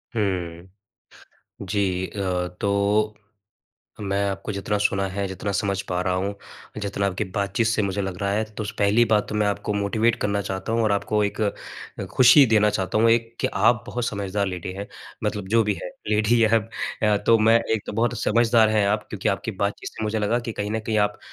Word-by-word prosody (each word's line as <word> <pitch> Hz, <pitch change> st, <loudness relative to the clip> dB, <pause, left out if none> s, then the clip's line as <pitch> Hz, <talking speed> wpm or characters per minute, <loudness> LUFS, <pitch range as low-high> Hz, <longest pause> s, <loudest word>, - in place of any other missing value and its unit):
हुँ। 90 Hz, -5 st, -2 dB, 0.9 s
जी 95 Hz, -2 st, -1 dB
अ, 105 Hz, -, -8 dB, 0.4 s
तो 100 Hz, +1 st, +1 dB, 0.9 s
मैं 100 Hz, 0 st, -1 dB
आपको 100 Hz, +2 st, -4 dB
जितना 100 Hz, +1 st, -2 dB
सुना 100 Hz, -1 st, +1 dB
है, 100 Hz, +1 st, -3 dB
जितना 95 Hz, +2 st, -4 dB
समझ 100 Hz, -1 st, -1 dB
पा 90 Hz, -1 st, -1 dB
रहा 90 Hz, 0 st, 0 dB
हूँ, 100 Hz, +2 st, -2 dB, 0.5 s
जितना 100 Hz, -1 st, -1 dB
आपकी 100 Hz, +2 st, -2 dB
बातचीत 100 Hz, +3 st, 0 dB
से 115 Hz, -1 st, +1 dB
मुझे 100 Hz, 0 st, -1 dB
लग 95 Hz, -2 st, -4 dB
रहा 100 Hz, 0 st, 0 dB
है। 110 Hz, +2 st, +1 dB, 0.2 s
तो -, -, -2 dB
पहली 105 Hz, +4 st, +4 dB
बात 110 Hz, -2 st, +1 dB
तो -, -, -5 dB
मैं 105 Hz, -1 st, +2 dB
आपको 100 Hz, +1 st, -1 dB
मोटिवेट 110 Hz, +3 st, +1 dB
करना 100 Hz, 0 st, 0 dB
चाहता 95 Hz, +3 st, -4 dB
हूँ 115 Hz, 0 st, +2 dB
और 110 Hz, -2 st, +2 dB
आपको 105 Hz, +1 st, 0 dB
एक 100 Hz, -, -3 dB, 0.7 s
खुशी 130 Hz, +3 st, +7 dB
देना 105 Hz, -1 st, +5 dB
चाहता 95 Hz, +1 st, -1 dB
हूँ, 115 Hz, +1 st, +5 dB
एक 115 Hz, 0 st, +1 dB
कि -, -, +2 dB
आप 120 Hz, -2 st, +3 dB
बहुत 125 Hz, -1 st, -3 dB
समझदार 100 Hz, -2 st, -2 dB
लेडी 90 Hz, -1 st, -5 dB
हैं, 100 Hz, +2 st, -6 dB, 0.4 s
मतलब 100 Hz, -2 st, -2 dB
जो 115 Hz, +1 st, +4 dB
भी 105 Hz, -1 st, 0 dB
है 90 Hz, -, -5 dB, 0.2 s
लेडी 110 Hz, +2 st, +3 dB
या 115 Hz, +1 st, +4 dB, 0.4 s
अ, 105 Hz, -1 st, +4 dB
तो 115 Hz, 0 st, +6 dB
मैं 110 Hz, +1 st, +5 dB, 0.2 s
एक 110 Hz, -, -2 dB
तो -, -, -5 dB
बहुत 115 Hz, +3 st, 0 dB
समझदार 115 Hz, 0 st, +4 dB
हैं 105 Hz, -2 st, +2 dB
आप 105 Hz, +1 st, 0 dB
क्योंकि 105 Hz, +1 st, -2 dB
आपकी 100 Hz, +2 st, -1 dB
बातचीत 100 Hz, 0 st, -2 dB
से -, -, -7 dB
मुझे 110 Hz, +1 st, -1 dB
लगा 105 Hz, +3 st, +1 dB
कि -, -, -2 dB
कहीं 105 Hz, -1 st, -4 dB
न 110 Hz, +1 st, -1 dB
कहीं 110 Hz, -1 st, +1 dB
आप 105 Hz, 0 st, +1 dB
105 Hz, 205 wpm, -24 LUFS, 100-110 Hz, 0.9 s, खुशी